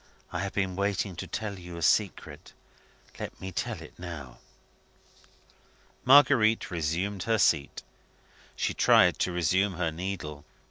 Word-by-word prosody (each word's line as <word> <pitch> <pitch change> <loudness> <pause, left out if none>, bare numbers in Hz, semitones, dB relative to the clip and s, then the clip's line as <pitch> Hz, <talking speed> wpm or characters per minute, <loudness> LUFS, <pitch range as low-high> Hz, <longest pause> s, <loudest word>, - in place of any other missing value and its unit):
"I 85 - -2
have 95 +1 -3
been 95 -2 -1
waiting 100 -1 -1
to - - -6
tell 105 -3 -5
you 90 -1 -9
a 85 - -5
secret. 100 +3 0 0.7
Let - - -7
me 95 0 -6
tell - - -4
it - - -15
now." 80 -8 -8 1.6
Marguerite 125 -6 +5
resumed 90 +4 -2
her 115 - +3
seat. 70 -8 +1 0.7
She - - -1
tried - - +4
to 90 - 0
resume 90 +3 +1
her 85 -2 -1
needle. 80 -4 -5
95 Hz, 135 wpm, -28 LUFS, 85-100 Hz, 1.6 s, Marguerite